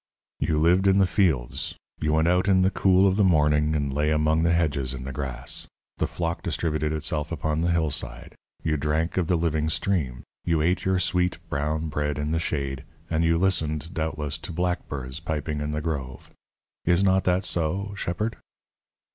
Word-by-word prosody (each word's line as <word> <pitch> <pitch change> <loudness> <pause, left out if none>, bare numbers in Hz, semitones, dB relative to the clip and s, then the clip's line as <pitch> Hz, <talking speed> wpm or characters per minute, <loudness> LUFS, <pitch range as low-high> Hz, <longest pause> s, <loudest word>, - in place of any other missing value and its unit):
"You 80 - +1
lived 90 +4 +4
in 95 0 +5
the 100 - +5
fields; 85 - 0 0.2
you 75 0 0
went 80 +1 +3
out 90 +2 +2
in 95 -1 +5
the 95 +1 +3
cool 95 0 +4
of 95 0 +1
the 105 - +4
morning 75 -3 +3
and 70 -2 -1
lay 75 +2 +1
among 75 +1 +2
the 85 +1 +3
hedges 70 -6 +1
in 65 - -7
the 70 - -5
grass. 65 -2 -4 0.3
The 80 - 0
flock 85 +2 -3
distributed 75 -2 -1
itself 75 0 -1
upon 80 0 -1
the 85 - +1
hillside; 75 -7 -1 0.3
you 80 -1 +1
drank 75 +4 -1
of 90 -3 +1
the 90 - +2
living 80 -2 0
stream; 75 -7 -1 0.2
you 85 -2 +1
ate 90 +4 +1
your 95 -1 +2
sweet, 90 -1 +1
brown 75 +3 -1
bread 75 0 -1
in 75 +1 -2
the 80 - +1
shade, 70 -4 -2 0.3
and 80 0 +2
you 85 0 +3
listened, 80 -3 0
doubtless, 75 -1 -3
to - - -7
blackbirds 80 -6 -3
piping 75 -2 -3
in 75 - -2
the 75 0 -2
grove. 70 -5 -5 0.5
Is 85 +3 +3
not 95 0 +3
that 90 +1 +2
so, 95 +5 0
shepherd?" 100 +3 -2
80 Hz, 185 wpm, -25 LUFS, 75-90 Hz, 0.5 s, in